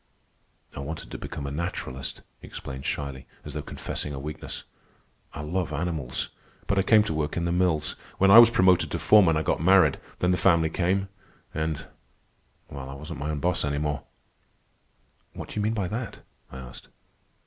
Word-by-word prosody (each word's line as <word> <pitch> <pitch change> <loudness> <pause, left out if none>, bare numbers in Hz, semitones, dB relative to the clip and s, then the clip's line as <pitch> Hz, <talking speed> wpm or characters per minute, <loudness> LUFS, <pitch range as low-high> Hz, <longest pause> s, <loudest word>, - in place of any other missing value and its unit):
"I - - -6
wanted 75 +4 -6
to - - -6
become 70 - -6
a 70 - -4
naturalist," 70 -4 -4 0.2
he - - -11
explained 65 0 -7
shyly, 70 -2 -4 0.2
as 75 - -7
though 75 - -3
confessing 75 0 -5
a - - -5
weakness. 75 +3 -6 0.7
"I 75 - -4
love 85 +3 -2
animals. 75 -4 -2 0.4
But 100 - +1
I - - +5
came 105 +2 +5
to 95 - -2
work 75 +1 -2
in 85 - 0
the 85 - 0
mills. 85 -4 +1 0.2
When 95 0 +5
I 115 - +12
was 115 -1 +10
promoted 95 -5 +4
to - - -2
foreman 95 -7 +5
I 80 - 0
got - - 0
married, 90 -4 +5 0.2
then 90 - +2
the 90 - +2
family 85 -4 +3
came, 95 +3 0 0.4
and... 80 -1 -2 0.8
well, 70 -1 -8
I 70 - -7
wasn't 75 +3 -7
my 75 - -3
own 75 -2 -2
boss 90 0 +1
any 70 0 -1
more." 75 0 -1 1.3
"What - - -8
do - - -9
you - - +1
mean 110 +2 0
by 100 -4 -1
that?" 115 +3 -5 0.3
I 65 - -8
asked. 60 -1 -10
80 Hz, 190 wpm, -26 LUFS, 75-95 Hz, 1.3 s, I